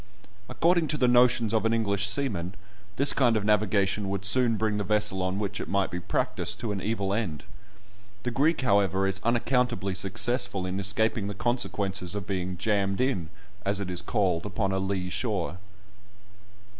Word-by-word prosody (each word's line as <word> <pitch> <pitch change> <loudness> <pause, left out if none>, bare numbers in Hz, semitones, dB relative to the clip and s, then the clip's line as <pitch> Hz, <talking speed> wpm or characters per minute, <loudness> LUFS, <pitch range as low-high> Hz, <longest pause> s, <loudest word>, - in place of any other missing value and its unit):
According 170 -1 +2
to 150 - -1
the 125 - +3
notions 120 -2 +4
of 110 - +2
an 115 0 +2
English 100 -3 +1
seaman, 100 -6 0 0.4
this 140 +1 +3
kind 120 -4 +3
of 105 - -2
navigation 100 -1 +1
would 100 0 -3
soon 115 +2 +4
bring 110 -1 0
the - - -1
vessel 105 -1 +1
on 90 +1 -1
which 100 -1 -3
it - - -6
might 100 -1 0
be 90 - -3
practised - - -1
to 115 - -2
an 100 -2 -3
evil 100 -3 -1
end. 95 -9 -3 0.8
The 125 - -2
Greek, 145 +6 +2
however, 100 -4 +2
is 95 0 -2
unaccountably 120 -3 +1
successful 100 0 0
in 90 +1 -3
escaping 100 +2 0
the 100 - -5
consequences 100 -6 -1
of 100 -3 -4
being 90 -1 -3
"jammed 100 -1 0
in," 125 - 0 0.3
as 100 0 0
it 95 -2 -4
is 90 - -2
called, 95 -7 0
upon 100 -1 -2
a 95 - 0
lee 95 -1 -2
shore. 95 -7 -2
100 Hz, 175 wpm, -27 LUFS, 95-115 Hz, 0.8 s, notions